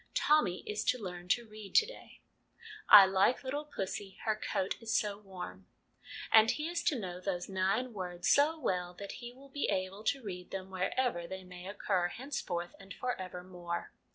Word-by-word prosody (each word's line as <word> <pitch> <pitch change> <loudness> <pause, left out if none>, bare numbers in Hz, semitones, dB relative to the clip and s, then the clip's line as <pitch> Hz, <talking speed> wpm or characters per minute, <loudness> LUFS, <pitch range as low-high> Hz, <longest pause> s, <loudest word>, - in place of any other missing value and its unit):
Tommy 290 -13 +3
is 210 0 -3
to 255 - +3
learn 180 -5 -7
to 235 +5 +2
read 215 -2 -11
to 445 - +7
day - - -12 0.4
" - - -30 0.3
I 205 -2 +12
like 195 +8 +3
little 285 +3 -3
pussy, 195 -7 -5
Her 220 -1 +2
coat 195 -2 -1
is 225 -1 -4
so 205 -1 -1
warm 180 - -8 0.3
" - - -41 0.3
and 220 0 +8
he 300 +5 0
is 340 0 -1
to 315 -6 +3
know 180 -5 -5
those 185 -1 -2
nine 195 +6 0
words 180 -3 -4
so 300 +3 +5
well 180 - -1
that 200 +2 -7
he 240 0 -6
will 270 +3 -16
be 285 +1 -1
able 195 +1 -2
to 270 +2 +1
read 180 -3 -6
them 190 0 -6
wherever 185 0 0
they 190 +1 -6
may 180 0 -10
occur 195 -3 0
henceforth 175 -7 -4
and 195 -1 -10
for 250 0 -1
evermore. 180 -1 -5
195 Hz, 190 wpm, -33 LUFS, 180-245 Hz, 0.4 s, I